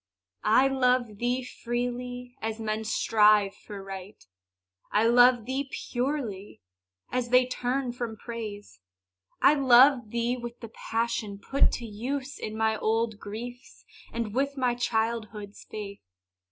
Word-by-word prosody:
I 255 +5 +6
love 250 -5 +1
thee 245 +2 0
freely, 245 0 -4
as 220 0 -3
men 220 0 -2
strive 210 -2 +4
for 205 -2 -10
Right; 195 +1 -9 0.7
I 215 +2 +3
love 245 0 +6
thee 265 +2 -2
purely, 245 -8 -3 0.5
as 250 -1 -1
they 250 +1 +5
turn 255 +1 -2
from 240 -2 -5
Praise. 210 - -7 0.6
I 285 - +8
love 260 -3 +6
thee 235 +2 0
with 240 -1 -7
the 230 - -8
passion 225 -2 -2
put 270 +7 +2
to 235 - -4
use 260 +6 -4
In 215 0 -5
my 220 0 +1
old 220 0 0
griefs, 240 +5 -8 0.3
and 230 -3 -3
with 280 +3 0
my 250 -2 +2
childhood's 220 -3 -2
faith. 200 -2 -7
235 Hz, 130 wpm, -28 LUFS, 215-250 Hz, 0.7 s, I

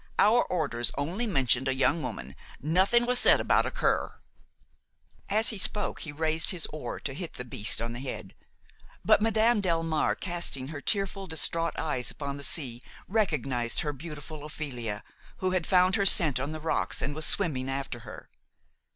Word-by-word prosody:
Our 230 +4 +5
orders 140 -9 -2
only 180 +12 -2
mentioned 135 - +2
a 135 - +1
young 150 +5 +1
woman, 70 - -7 0.2
nothing 190 - +2
was 250 0 +3
said - - +6
about - - +2
a - - -1
cur–" - - -1 1.1
As 215 +3 +3
he 215 - -2
spoke 205 +2 +3
he 155 - -6
raised 160 +2 0
his 180 -5 -1
oar 155 - -6
to 135 - -4
hit 165 +3 -7
the 125 - -6
beast 110 -3 +1
on 115 0 -3
the 120 - -7
head; 135 0 -7 0.7
but - - +4
Madame 220 +1 +2
Delmare, 165 -4 0
casting 170 -7 -3
her 150 -2 -7
tearful, 195 0 -2
distraught 165 0 0
eyes 140 -6 -1
upon 140 -1 -6
the 140 - -7
sea, 125 -6 +1 0.3
recognized 135 - 0
her 150 -3 -3
beautiful 150 0 -9
Ophelia, 125 -9 -5 0.3
who 185 0 -1
had 185 -3 -1
found 185 0 +4
her 200 - +1
scent 150 -8 +7
on 140 +3 -3
the 155 - -6
rocks 160 +1 -1
and 145 - -2
was 155 +1 -1
swimming 130 -5 0
after 135 -2 -4
her. 115 -2 -11
155 Hz, 175 wpm, -28 LUFS, 135-185 Hz, 1.1 s, scent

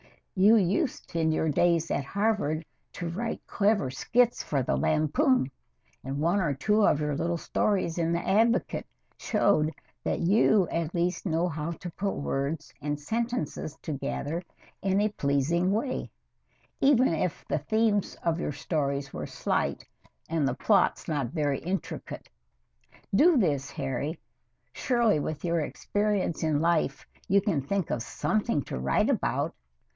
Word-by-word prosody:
You 205 +4 +6
used 205 - 0
in 160 -1 +2
your 160 0 +1
days 170 +2 +2
at 140 - 0
Harvard 200 -3 0 0.3
to 175 - -4
write 225 +8 -4
clever 205 - +1
skits 240 - +2
for 140 -3 -1
the - - 0
"Lampoon," 155 - +2 0.5
and 135 +1 -4
one 175 +6 +2
or 150 -6 0
two 210 +10 +2
of 150 - +3
your 150 -1 -1
little 170 +4 -1
stories 180 -1 0
in 165 0 +1
the 170 +1 -1
"Advocate" 225 +5 +2 0.3
showed 200 -8 +2 0.3
that - - -1
you 200 +1 +4
at 165 0 -2
least 175 +3 0
know 165 +1 +1
how 160 0 -3
to 175 +1 -8
put 200 +3 -2
words 140 +3 -3
and 145 +1 -2
sentences 220 -4 -3
together 150 +2 -3 0.4
in 195 0 +1
a 210 +1 +2
pleasing 165 +2 +1
way, 230 +6 -1 0.7
even 270 -2 +5
if 165 +1 -2
the 150 - 0
themes 215 +5 +1
of 170 0 +1
your 150 - -2
stories 140 -2 -2
were - - -4
slight - - -1 0.4
and 160 -4 0
the 130 - -1
plots 200 +6 +2
not 145 -6 -1
very 145 0 -1
intricate. 185 +3 -5 0.9
Do 310 - +6
this, 145 - +1
Harry. 140 +5 -3 0.6
Surely 235 - +2
with 150 +2 -4
your 170 -1 +1
experience 205 +2 -1
in 155 -2 +1
life 165 -4 +1 0.2
you 200 +2 +5
can 190 -9 0
think 190 +5 -2
of 115 - -1
something 210 - -1
to - - -5
write 65 +1 +2
about. - - 0
170 Hz, 150 wpm, -28 LUFS, 150-205 Hz, 0.9 s, You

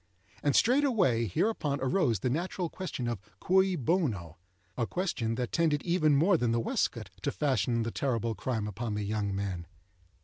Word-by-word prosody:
And 145 - +1
straightway 225 - +3
hereupon, 145 - 0
arose 130 - +1
the 125 - +1
natural 175 +3 -2
question 175 -10 -4
of 120 -5 -3 0.2
cui 190 0 +3
bono?—a 95 - -2
question 125 -12 -1
that 125 0 -3
tended 155 -3 +1
even 160 -4 +3
more 170 +6 +4
than 120 -5 +1
the 115 - +2
waistcoat 115 - -1
to - - -1
fasten 120 -4 +1
the 115 - -3
terrible 115 -4 -1
crime 110 -2 -2
upon 110 +1 -3
the 105 - -2
young 100 -1 -1
man. 95 -4 -3
125 Hz, 160 wpm, -30 LUFS, 110-170 Hz, 0.2 s, more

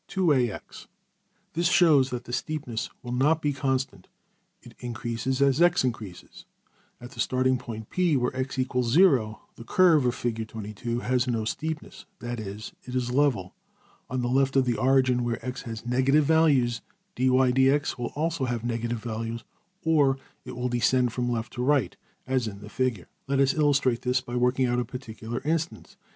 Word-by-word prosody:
25in]{097b} 145 - 0 0.7
This 170 +2 +1
shows 155 -7 +5
that 125 -1 -4
the 120 - -9
steepness 125 -3 -3
will 120 - -6
not 145 +6 +2
be 145 -2 0
constant: 130 -8 -2 0.6
it - - -13
increases 125 +2 -2
as 140 +3 +3
$x$~increases. 125 - 0 0.5
At 120 0 -10
the - - -13
starting 130 0 +1
point~$P$, 125 +9 -1
\DPPageSep{098.png}% - - +3
where 125 +1 -1
$x 130 0 -3
= - - -12
0$, 125 - +3 0.2
the - - -9
curve 150 -4 +4
(\Fig) 110 0 -4
has 125 0 +1
no 115 -3 -1
steepness 155 +7 -5
that 120 0 -5
is, 105 0 -7
it 125 - -8
is 125 -1 -1
level. 125 -9 +1 0.6
On 130 -1 -2
the - - 0
left 135 +2 +2
of 135 -1 +4
the 120 -2 +1
origin, 130 -2 +3
where 120 -1 -1
$x$ 125 0 -4
has 115 -1 -7
negative 130 +5 +3
values, 140 -8 +3 0.3
$\dfrac{dy}{dx}$~will 130 0 +2
also 155 -2 -1
have 120 -2 -3
negative 120 0 -2
values, 115 0 -4 0.4
or 145 -4 +3 0.3
will 125 +1 -3
descend 125 0 +2
from 125 -1 -1
left 115 -1 -3
to 125 - -3
right, 130 - +2 0.3
as 130 -3 0
in 100 -2 -6
the 105 - -10
Figure. 125 -8 -2 0.2
Let 140 0 0
us 135 -1 +4
illustrate 140 -5 +2
this 125 0 +1
by 125 -1 -7
working 125 +1 +2
out 120 0 +1
a - - +1
particular 120 -1 -7
instance. 165 +2 -2
125 Hz, 165 wpm, -26 LUFS, 120-135 Hz, 0.7 s, shows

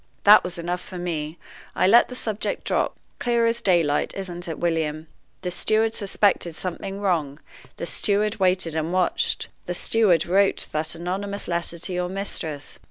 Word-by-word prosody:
That 210 +1 +8
was 180 0 -5
enough 175 +1 -3
for 185 - -9
me: 165 -2 -3 0.4
I - - +3
let 230 +6 +6
the 250 - -8
subject 220 -4 -3
drop. - - 0 0.2
Clear 235 -1 +2
as 230 +1 0
daylight, 170 -8 +2
isn't 175 -2 -6
it, 165 - -4
William? 160 -2 -1 0.4
The 180 - -2
steward 220 +5 +2
suspected 195 -5 +1
something 190 +3 -4
wrong 160 -8 0 0.4
the - - -5
steward 210 +4 0
waited 185 -3 +2
and 160 +1 -1
watched 180 -1 0 0.2
the 180 - -2
steward 190 -6 +3
wrote 195 +3 +2
that 155 +2 -1
anonymous 195 +4 -4
letter 170 0 -1
to 180 +2 -3
your 180 0 -1
mistress. 165 -7 -5
180 Hz, 165 wpm, -24 LUFS, 170-200 Hz, 0.4 s, That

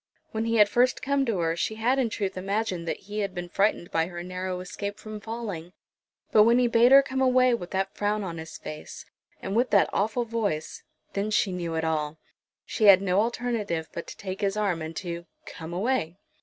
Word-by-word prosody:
When 220 0 -2
he 230 0 +1
had 210 -2 +7
first 245 +5 +2
come 275 0 +1
to 225 -4 0
her 165 0 +1
she 220 +5 -2
had 245 +5 +1
in 245 -3 +1
truth 200 -3 -3
imagined 190 -2 -2
that - - -3
he 210 +2 -5
had 195 -2 -2
been 175 0 -5
frightened 195 -2 +1
by 165 0 +1
her 175 -1 -7
narrow 185 0 -4
escape 200 +3 -5
from 215 0 -8
falling. 205 -6 -6 0.6
But 215 - +7
when 230 +3 +6
he 250 - +4
bade 235 +2 +5
her 275 0 +9
come 265 -1 -2
away 255 -1 +4
with 185 -7 -3
that 195 0 -1
frown 210 0 0
on 170 -3 -5
his 160 0 -8
face, 155 0 -8 0.4
and 195 - -3
with 245 +2 +2
that 200 -2 +4
awful 220 +4 0
voice, 215 -9 -2 0.3
then 200 +2 -1
she 210 -2 +2
knew 170 -2 -3
it 160 - -1
all. 155 -1 -1 0.5
She 220 - 0
had 195 -2 +9
no 185 0 +2
alternative 220 -8 -2
but 170 - -6
to - - -9
take 190 0 -6
his 200 0 0
arm, 195 -6 0
and 160 +1 -6
to 170 -1 -5 0.2
"come 160 +1 -8
away." 185 -2 -1
200 Hz, 215 wpm, -27 LUFS, 175-230 Hz, 0.6 s, her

